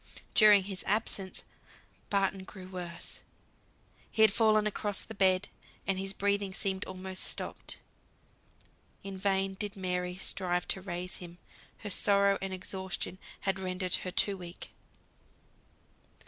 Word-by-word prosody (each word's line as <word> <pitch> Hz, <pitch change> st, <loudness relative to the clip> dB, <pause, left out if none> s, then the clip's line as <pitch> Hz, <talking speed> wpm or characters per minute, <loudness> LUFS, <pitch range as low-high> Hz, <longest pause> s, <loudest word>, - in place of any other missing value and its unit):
During 210 Hz, -3 st, +8 dB
his 190 Hz, -1 st, -5 dB
absence, 200 Hz, -2 st, -1 dB, 0.7 s
Barton 195 Hz, -1 st, +1 dB
grew 190 Hz, -1 st, -10 dB
worse; 175 Hz, -2 st, -6 dB, 0.9 s
he 220 Hz, -, +4 dB
had 215 Hz, -2 st, +7 dB
fallen 215 Hz, -2 st, +4 dB
across 205 Hz, -1 st, -1 dB
the 220 Hz, -, -8 dB
bed, 190 Hz, -1 st, +3 dB, 0.4 s
and 190 Hz, -1 st, 0 dB
his 195 Hz, 0 st, 0 dB
breathing 200 Hz, -1 st, 0 dB
seemed 190 Hz, 0 st, -1 dB
almost 185 Hz, 0 st, -2 dB
stopped; -, -, -2 dB, 1.3 s
in 195 Hz, -1 st, -5 dB
vain 195 Hz, 0 st, +1 dB
did 205 Hz, +2 st, -3 dB
Mary 180 Hz, -1 st, -1 dB
strive 180 Hz, -2 st, +1 dB
to 190 Hz, -, -1 dB
raise 180 Hz, -1 st, -4 dB
him, 175 Hz, -1 st, -10 dB, 0.4 s
her 205 Hz, -, -5 dB
sorrow 200 Hz, 0 st, +4 dB
and 195 Hz, 0 st, -3 dB
exhaustion 190 Hz, 0 st, -3 dB, 0.2 s
had 195 Hz, 0 st, +1 dB
rendered 185 Hz, -1 st, -2 dB
her 185 Hz, -, -4 dB
too 200 Hz, +2 st, +3 dB
weak. 175 Hz, -1 st, -8 dB
190 Hz, 130 wpm, -31 LUFS, 185-200 Hz, 1.3 s, During